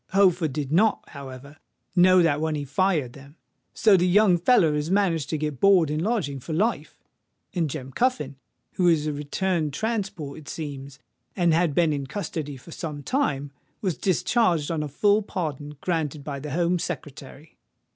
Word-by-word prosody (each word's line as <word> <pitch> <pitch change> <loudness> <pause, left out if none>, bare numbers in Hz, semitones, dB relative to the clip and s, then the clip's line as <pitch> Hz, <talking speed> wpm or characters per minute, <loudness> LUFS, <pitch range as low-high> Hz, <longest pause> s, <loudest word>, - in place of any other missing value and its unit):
Holford 180 -5 +3
did 140 0 -4
not, 210 +6 +2
however, 140 +1 -10 0.4
know 185 0 +6
that 150 -2 +2
when 160 -1 0
he 145 -1 -3
fired 150 -3 0
them. 140 +2 -14 0.4
So 215 -3 +5
the 180 0 +3
young 185 -1 +4
feller 175 -5 +4
has 150 +1 -2
managed 180 -6 +1
to 160 - -1
get 150 -3 -3
board 185 -6 +5
and 155 +1 -1
lodging 180 - -1
for 160 +5 -6
life; 215 +9 -1 0.6
and 170 -4 0
Jem 135 -2 -6
Cuffin, 150 - -1 0.3
who 180 - +1
is 160 -3 +3
a 155 - -1
returned 155 +2 -1
transport, 195 - -3
it 150 - -12
seems, 140 -3 -7 0.4
and 175 -3 +3
had 165 -3 +2
been 165 -3 +3
in 140 -2 -3
custody 150 -4 -5
for 150 +6 -14
some 150 -3 -6
time, 145 - -1 0.3
was 185 -6 -1
discharged 180 -4 +1
on 160 -2 -1
a 150 - -3
full 205 +9 +2
pardon 150 -7 -5
granted 155 -5 -2
by 140 -1 -5
the 150 +2 -6
Home 175 +4 +1
Secretary." 145 0 -7
160 Hz, 175 wpm, -25 LUFS, 145-185 Hz, 0.6 s, know